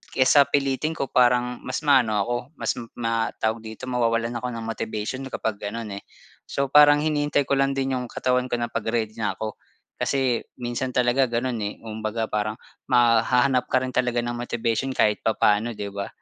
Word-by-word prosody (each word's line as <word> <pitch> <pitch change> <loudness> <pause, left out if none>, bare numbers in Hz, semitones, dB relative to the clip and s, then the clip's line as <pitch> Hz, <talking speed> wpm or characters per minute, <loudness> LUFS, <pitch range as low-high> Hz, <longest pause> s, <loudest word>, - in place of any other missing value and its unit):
kaysa 135 +2 +5
pilitin 140 +2 0
ko 140 - -3
parang 125 0 +3
mas - - -4
maano 130 -7 +4
ako 120 +4 -2 0.2
mas - - -1 0.2
ma 115 -1 0
tawag 110 +1 -1
dito, 110 -1 -10
mawawalan 115 -1 +1
ako 125 - -4
ng 115 - -5
motivation 110 +1 -4
kapag 110 -5 -3
gano'n, 105 -1 -5
eh. - - -24 0.4
So 140 -1 -2
parang 145 0 +7
hinihintay 145 -2 +1
ko 140 0 0
lang 135 0 +2
din 135 0 -1
yung 125 - -5
katawan 125 +1 0
ko 125 - -1
na 120 -1 -3
'pag - - -3
ready 110 -1 0
na 105 - -1
ako. 110 -1 -6 0.4
Kasi 130 -4 +1 0.2
minsan 120 +1 -3
talaga 125 +1 +3
gano'n, 120 0 -2
eh, 105 -1 -3
kumbaga 110 0 -3
parang 105 0 -1 0.3
ma 120 -2 +5
hahanap 125 +2 +2
ka 130 0 +1
rin 130 - -3
talaga 125 -1 0
ng 120 - -2
motivation 120 +2 -2
kahit 105 0 +2
papaano, 110 +1 +1
'di 100 -1 -5
ba? 100 0 -4
120 Hz, 185 wpm, -24 LUFS, 110-130 Hz, 0.4 s, parang